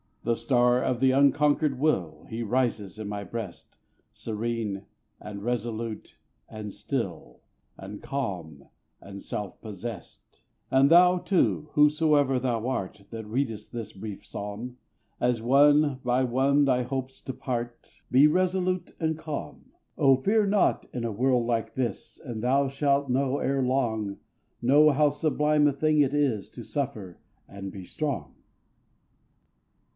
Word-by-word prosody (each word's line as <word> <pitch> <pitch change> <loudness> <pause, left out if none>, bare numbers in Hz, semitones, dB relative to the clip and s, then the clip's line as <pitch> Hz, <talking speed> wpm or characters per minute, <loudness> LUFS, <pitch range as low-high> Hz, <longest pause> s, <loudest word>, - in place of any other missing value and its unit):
The 115 - +1
star 125 0 +2
of 125 -2 0
the 130 0 +4
unconquered 145 0 +3
will, 95 - 0
He 115 +1 -4
rises 115 -4 -1
in 110 -1 -5
my 100 0 -4
breast, 105 -4 -7 0.4
Serene, 110 -2 -3 0.4
and 100 -1 -8
resolute, 115 -2 -4 0.3
and 105 -2 -7
still, 90 - -5 0.4
And 100 +2 -9
calm, 90 - -5 0.3
and 100 0 -10
self 105 -2 -5
possessed. 105 -1 -9 0.3
And 135 +1 +5
thou, 180 +2 +6
too, 175 -5 +1
whosoe'er 150 -3 +3
thou 120 -2 -1
art, 100 -5 -4
That 110 -2 -7
readest 115 -2 -3
this 115 -3 -6
brief 100 +1 -8
psalm, 105 +5 -6 0.4
As 125 -1 +1
one 145 +3 +4
by 125 +1 +2
one 135 +3 +3
thy 125 -2 +2
hopes 130 +1 -4
depart, 120 -2 -5
Be 135 +3 +6
resolute 185 +1 0
and 160 -1 0
calm. 150 - -7 0.3
Oh, 135 -1 +5
fear 205 - +2
not 200 0 +2
in 125 - -3
a 115 - -1
world 125 +2 +1
like 115 -2 -1
this, 120 -6 -4
And 120 -6 -6
thou 135 +3 +3
shalt 140 0 +1
know 135 +2 +1
ere 135 -1 0
long, 115 -6 0 0.5
Know 145 +5 +6
how 150 +1 +3
sublime 150 0 +2
a 145 - +2
thing 155 +2 +2
it 140 -1 +3
is 140 -8 0
To 120 - -10
suffer 120 - -4 0.3
and 100 -1 -7
be 95 -2 -9
strong. 115 - -4
125 Hz, 140 wpm, -27 LUFS, 110-140 Hz, 0.5 s, thou